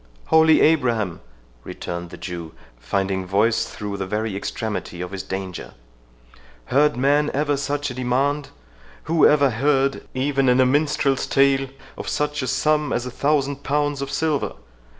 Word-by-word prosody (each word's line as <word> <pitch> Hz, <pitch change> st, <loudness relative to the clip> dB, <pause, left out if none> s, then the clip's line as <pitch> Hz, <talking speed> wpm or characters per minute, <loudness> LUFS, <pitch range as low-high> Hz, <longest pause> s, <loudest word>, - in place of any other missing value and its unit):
"Holy 160 Hz, -1 st, +5 dB
Abraham!" 120 Hz, -, +2 dB, 0.4 s
returned 85 Hz, 0 st, -6 dB
the -, -, -10 dB
Jew, 85 Hz, -3 st, -7 dB, 0.3 s
finding 95 Hz, +9 st, -1 dB
voice 100 Hz, +5 st, +1 dB
through 105 Hz, -1 st, -6 dB
the 95 Hz, -1 st, -4 dB
very 105 Hz, +1 st, -2 dB
extremity 100 Hz, -3 st, -4 dB
of 90 Hz, +1 st, -5 dB
his 95 Hz, -1 st, -4 dB
danger, 95 Hz, -2 st, -6 dB, 1.0 s
"heard 145 Hz, -1 st, +4 dB
man 145 Hz, +3 st, +2 dB
ever 145 Hz, 0 st, +1 dB
such 145 Hz, 0 st, -2 dB
a -, -, -6 dB
demand?—Who 130 Hz, -, -1 dB
ever 145 Hz, -3 st, +4 dB
heard, 135 Hz, +3 st, +1 dB
even 135 Hz, 0 st, +1 dB
in 125 Hz, +1 st, +4 dB
a 130 Hz, -, +6 dB
minstrel's 140 Hz, 0 st, +1 dB
tale, 135 Hz, 0 st, +3 dB, 0.3 s
of -, -, -4 dB
such 150 Hz, 0 st, -1 dB
a 130 Hz, -, -3 dB
sum 150 Hz, +3 st, +1 dB
as 120 Hz, -, -1 dB
a 125 Hz, -, -5 dB
thousand 140 Hz, 0 st, 0 dB
pounds 145 Hz, 0 st, -1 dB
of 140 Hz, -, -4 dB
silver? 155 Hz, 0 st, -1 dB
135 Hz, 150 wpm, -22 LUFS, 100-145 Hz, 1.0 s, a